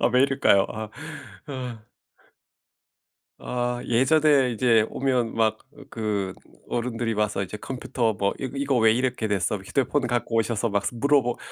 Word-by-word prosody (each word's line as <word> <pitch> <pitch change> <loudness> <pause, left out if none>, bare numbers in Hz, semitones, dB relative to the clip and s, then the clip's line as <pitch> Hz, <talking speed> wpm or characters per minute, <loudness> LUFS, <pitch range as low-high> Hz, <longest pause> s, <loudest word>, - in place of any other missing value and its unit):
아 - - +4
왜 125 - +5
이럴까요 135 -8 +3
아. 110 0 -5 0.6
아. 125 -5 -6 1.6
아 120 0 -2
예전에 135 +1 +4
이제 115 -1 +3
오면 130 -4 0
막 110 -1 +2 0.3
그 105 -4 -2 0.4
어른들이 120 -1 -1
와서 105 -2 0
이제 105 +3 -7
"컴퓨터 120 -2 -2
뭐 100 +1 0
이 130 - -3
이거 140 -1 0
왜 110 -1 +5
이렇게 125 -2 0
됐어?" 100 +1 0
휴대폰 130 +7 -1
갖고 120 -1 -1
오셔서 115 0 +1
막 100 -1 0
스 - - -2
물어보 130 -1 +2
120 Hz, 270 characters per minute, -25 LUFS, 110-130 Hz, 1.6 s, 왜